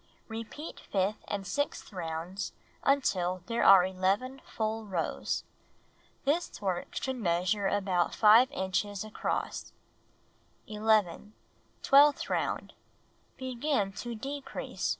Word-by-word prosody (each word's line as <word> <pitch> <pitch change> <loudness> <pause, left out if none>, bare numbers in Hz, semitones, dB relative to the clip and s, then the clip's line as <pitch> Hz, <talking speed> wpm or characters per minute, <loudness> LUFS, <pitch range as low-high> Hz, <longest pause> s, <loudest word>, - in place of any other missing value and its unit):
Repeat 225 +8 -7
fifth 195 +2 -1
and 200 -1 -3
sixth 285 +2 -3
rounds 175 +2 -4 0.3
until 185 -10 +1
there 235 0 0
are 190 -2 +8
11 195 +8 -1
full 220 0 -3
rows. 185 -6 -2 0.8
The 300 +5 +3 0.2
work 185 -3 -3
should 265 -1 -2
measure 185 0 +1
about 190 -4 +1
5 225 +4 +7
inches 205 -4 -2
across. 215 0 -3 0.9
11. 210 -2 +1 0.5
Twelfth 285 +1 +5
round. - - -1 0.6
Begin 255 -5 -1
to 240 +2 -5
"decrease." 275 +5 -4
210 Hz, 100 wpm, -30 LUFS, 185-250 Hz, 0.9 s, are